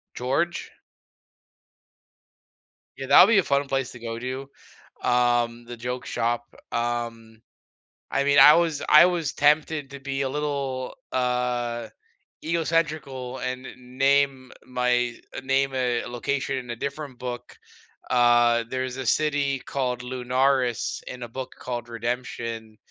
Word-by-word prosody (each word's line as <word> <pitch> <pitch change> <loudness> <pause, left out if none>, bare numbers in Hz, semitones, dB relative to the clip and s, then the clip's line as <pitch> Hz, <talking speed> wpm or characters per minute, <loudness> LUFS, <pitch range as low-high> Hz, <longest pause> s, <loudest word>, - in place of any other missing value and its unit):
George? 145 +8 -1 2.3
Yeah, 135 - -6
that'll 180 - +8
be 225 -1 +4
a - - +2
fun 140 -1 +1
place 135 -1 -1
to 125 - -11
go 115 -1 -5
to, 130 +2 -5 0.5
um, 120 -1 +1
the 120 +1 -8
joke 125 +2 -5
shop. 120 +1 -2 0.2
Um, 115 -1 -3 0.7
I 140 - +1
mean, 140 0 +3
I 150 +2 +10
was 165 -3 +1
I 155 +3 +9
was 170 -5 -1
tempted 150 -1 +2
to 140 -1 -9
be 135 0 -3
a 135 - 0
little, 140 -2 -3 0.2
uh, 125 -2 -1 0.5
ego 165 +1 0
centrical 145 -6 -2
and 125 0 -3
n 125 0 -13
name 135 -1 +2 0.2
my 125 -1 +1 0.3
name 135 0 +1
a 125 -2 0
location 130 +2 -2
in 125 -2 -8
a 120 - -4
different 140 0 -5
book. 125 -1 -6 0.6
Uh, 120 -1 +4
there's 130 0 -3
a 130 - -4
city 145 0 +1
called 125 -2 -2
Lunaris 125 0 0
in 125 -1 -7
a 120 - -5
book 130 +2 -6
called 120 -1 -5
Redemption 115 -2 -4
130 Hz, 135 wpm, -25 LUFS, 120-140 Hz, 2.3 s, I